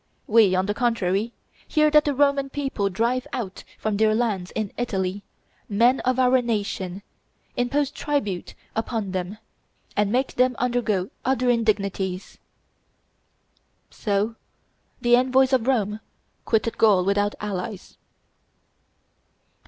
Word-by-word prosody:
We, 215 -4 +5
on 185 +1 +1
the 205 - -1
contrary, 220 -2 0 0.4
hear 305 -1 +3
that 300 0 +5
the 290 -2 0
Roman 280 0 +2
people 270 -8 -2
drive 235 +6 0
out 195 -6 -4
from 215 -2 -1
their 215 0 +3
lands, 210 -6 -1
in 215 -3 -2
Italy, 195 -5 -2 0.5
men 235 +6 +4
of 255 0 0
our 255 0 +4
nation, 200 -4 -3 0.5
impose 275 +3 0
tribute 280 - -2 0.2
upon 225 -3 -2
them, 185 +2 -3 0.6
and 205 -1 +1
make 260 +3 0
them 250 0 +2
undergo 230 -6 0
other 255 -1 +2
indignities." 200 -5 -1 1.5
So 210 +2 -1 0.6
the 240 0 +5
envoys 260 +1 +3
of 250 -2 +2
Rome 215 -5 +1 0.5
quitted 225 0 0
Gaul 200 -5 +5
without 205 +1 +1
allies. 205 0 -5
225 Hz, 120 wpm, -24 LUFS, 200-250 Hz, 1.5 s, We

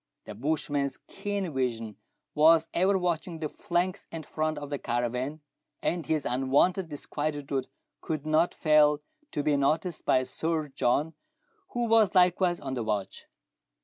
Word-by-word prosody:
The - - -7
bushman's 145 +1 -1
keen 200 -5 -3
vision 115 -5 -2 0.4
was 160 +2 +5
ever 190 +3 +3
watching 175 -1 -2
the 160 -1 -3
flanks 180 +5 -2
and 165 -1 -6
front 155 0 -2
of 145 0 -7
the 145 - -2
caravan, 125 +5 -2 0.4
and 170 -2 -2
his 155 -3 0
unwonted 140 +9 +2
disquietude 145 -2 -3 0.3
could 155 -2 -3
not 155 +3 +2
fail 150 -1 +4 0.3
to 145 - -2
be 150 0 +2
noticed 155 +4 0
by 130 - +3
Sir 155 +4 -2
John, 140 +5 +1 0.6
who 240 0 0
was 220 -4 +4
likewise 180 -1 +4
on 135 -2 -5
the 125 - -2
watch. 105 -3 -3
155 Hz, 145 wpm, -28 LUFS, 140-170 Hz, 0.6 s, was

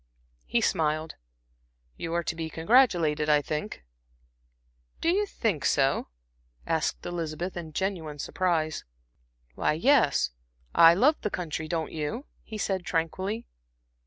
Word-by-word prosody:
He - - +1
smiled. 155 0 0 0.8
"You 165 - -5
are 170 - +1
to 160 - -3
be 165 -1 -4
congratulated, 165 - +3
I 150 -1 +6
think." 145 - -4 1.2
"Do 330 - +1
you 410 +3 +1
think 210 - -1
so?" 135 0 +2 0.6
asked 160 -3 -1
Elizabeth, 170 +1 -4
in 165 -3 -6
genuine 165 -4 -3
surprise. 160 -1 -1 0.7
"Why, - - +1
yes, 165 - +3 0.4
I 165 0 +8
love 285 - +3
the 210 - -1
country; 160 -4 -4
don't 160 -1 -2
you," 160 - -4 0.2
he 220 - -8
said 190 -3 -1
tranquilly. 185 +6 -2
165 Hz, 125 wpm, -27 LUFS, 155-190 Hz, 1.2 s, I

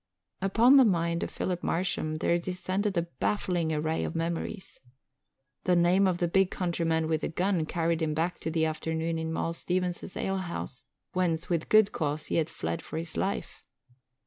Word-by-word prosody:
Upon 230 +8 +6
the 270 - +8
mind 170 -5 +1
of - - -2
Philip 180 -1 -3
Marsham 165 -3 -1
there 170 +2 +1
descended 185 +3 -2
a 170 - +3
baffling 170 +1 -1
array 155 +1 0
of - - -4
memories. 170 +4 -3 0.9
The 180 - +4
name 180 +3 +4
of 180 -2 +1
the 175 - +1
big 190 +2 +3
countryman 165 -3 0
with 160 -1 0
the - - -1
gun 175 -1 0
carried 165 0 0
him 155 -1 0
back 165 +3 -1
to - - -3
that 160 0 +1
afternoon 160 +1 -2
in 160 0 -3
Moll 165 +1 -1
Stevens's 180 +1 -2
alehouse, 180 -8 -3 0.3
whence 175 -3 0
with 165 -2 0
good 215 -1 +6
cause 150 -1 -2
he - - -1
had 160 -1 +1
fled 85 +1 -3
for - - -7
his 160 0 -4
life. 195 - -3
170 Hz, 175 wpm, -29 LUFS, 160-185 Hz, 0.9 s, the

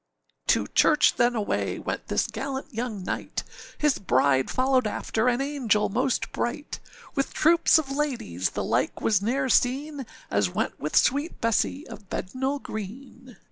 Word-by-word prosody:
To - - +3
church - - +4
then 240 0 +3
away 215 -3 -1
went - - -4
this - - +1
gallant 270 -1 -5
young 225 -4 -4
knight, - - -3 0.3
His 295 -3 +2
bride 130 -5 +2
followed 255 -2 +2
after, 220 +2 -1
an 245 +1 +2
angel 265 -7 +1
most 255 +5 0
bright, 265 +5 -3 0.3
With 275 -3 -2
troops 335 +1 +5
of 290 -4 -2
ladies, 250 - -1
the - - -3
like - - 0
was 210 -4 +2
neâer 255 +5 0
seen, 275 +2 +1 0.2
As 100 -2 +2
went - - -2
with 150 - -3
sweet 285 +6 +2
Bessee 230 +6 0
of 200 -4 -11
Bednall 265 +8 -2
Green. 240 +3 -8
250 Hz, 150 wpm, -26 LUFS, 210-275 Hz, 0.3 s, troops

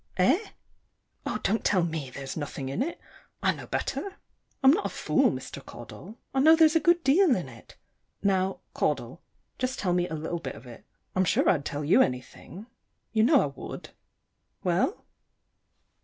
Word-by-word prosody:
Eh? 265 - +3 0.8
Oh, - - -1
don't 220 +3 +1
tell 185 -4 +3
me 160 -5 -3
there's 135 +1 -7
nothing 145 -3 -5
in 135 - -2
it; 330 +6 -2 0.4
I - - +4
know - - -10
better. 395 -1 -3 0.5
I'm 265 - +8
not 395 +7 +1
a - - -6
fool, - - +2
Mr. - - -6
Caudle; 220 - -11 0.2
I 265 - +1
know 315 +4 +7
there's 320 0 +5
a - - +6
good 345 +2 +3
deal 300 +1 +5
in 175 -9 -3
it. 115 -3 -14 0.5
Now, 190 -1 +1
Caudle, - - -1 0.4
just 255 +1 -1
tell 180 -3 0
me 175 0 +1
a 160 - -4
little 160 +2 -3
bit - - -6
of 125 - -13
it. 120 -2 -12 0.3
I'm 185 - +3
sure 180 - +2
I'd 145 -6 +2
tell 145 0 -3
you 155 - +5
anything. 130 - -3 0.5
You 220 - +3
know 260 +4 +5
I - - 0
would. 140 -1 -8 0.7
Well? 185 - 0
190 Hz, 175 wpm, -27 LUFS, -, 0.8 s, I'm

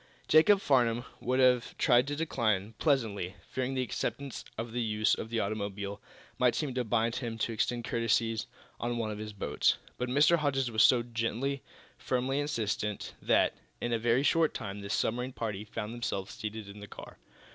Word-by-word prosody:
Jacob 195 +6 +6
Farnum 120 - +2
would 130 +2 0
have 125 -2 +3
tried 125 0 +4
to 145 - -2
decline, 115 -9 0
pleasantly, 110 - 0
fearing 130 +1 -2
the 130 - +1
acceptance 125 +2 -4
of 115 +1 -4
the 120 +1 -1
use 110 -1 +2
of 110 - -3
the 115 0 0
automobile 100 -1 -3 0.4
might 125 -2 +4
seem 145 -5 -1
to 125 0 0
bind 115 +1 +1
him 115 -3 -4
to 115 - -1
extend 120 +2 -1
courtesies 115 -1 +1 0.3
on 120 0 -2
one 110 -2 -1
of 105 - -6
his 105 0 -5
boats. 100 - +1 0.2
But 125 0 -1
Mr. 150 +6 +5
Hodges 135 -5 0
was 110 -1 +3
so 120 -1 +6
gently, 120 +4 -2 0.4
firmly 130 +2 0
insistent 110 -7 -2
that, - - +3 0.3
in 120 - -1
a 115 - +1
very 120 +3 +2
short 160 +2 +3
time, 100 -1 -5
the 100 - -7
submarine 125 +5 0
party 105 -3 -4
found 110 +1 -5
themselves 100 -5 -3
seated 110 -1 -6
in 100 +1 -10
the 105 - -9
car. - - -11
115 Hz, 180 wpm, -31 LUFS, 110-130 Hz, 0.4 s, Jacob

